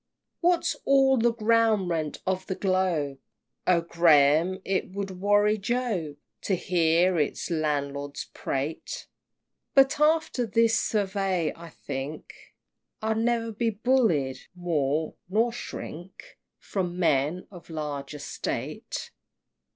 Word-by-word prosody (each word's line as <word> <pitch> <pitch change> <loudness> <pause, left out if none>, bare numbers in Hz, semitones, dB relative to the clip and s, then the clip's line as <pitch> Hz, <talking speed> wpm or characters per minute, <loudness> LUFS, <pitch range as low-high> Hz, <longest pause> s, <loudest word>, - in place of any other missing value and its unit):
XXIX. - - -58
What's 350 0 +2
all 270 -1 +4
the 235 0 +3
ground 225 -3 +3
rent 160 -3 -2
of 185 0 -1
the 190 - -2
globe? 180 -8 0 0.5
Oh, 175 -2 +4
Graham, 165 +1 +4
it 190 0 -1
would 195 -2 -5
worry 205 +1 +3
Job 205 -9 -1 0.3
To 195 - 0
hear 175 0 +2
its 150 +4 -1
landlords 145 -3 -2
prate! 140 +4 -4 0.7
But 270 +1 +5
after 300 -5 +2
this 225 +2 +3
survey, 195 -5 0
I 170 0 -11
think 140 0 -6 0.7
I'll 220 0 +1
ne'er 230 0 0
be 230 +2 0
bullied 205 - +1 0.2
more, 160 -3 -1 0.2
nor 225 +4 +2
shrink 190 -6 -8 0.2
From 180 -3 -3
men 160 0 +1
of 175 -3 -13
large 150 -3 -5
estate! 145 -1 -5
185 Hz, 115 wpm, -27 LUFS, 155-220 Hz, 0.7 s, But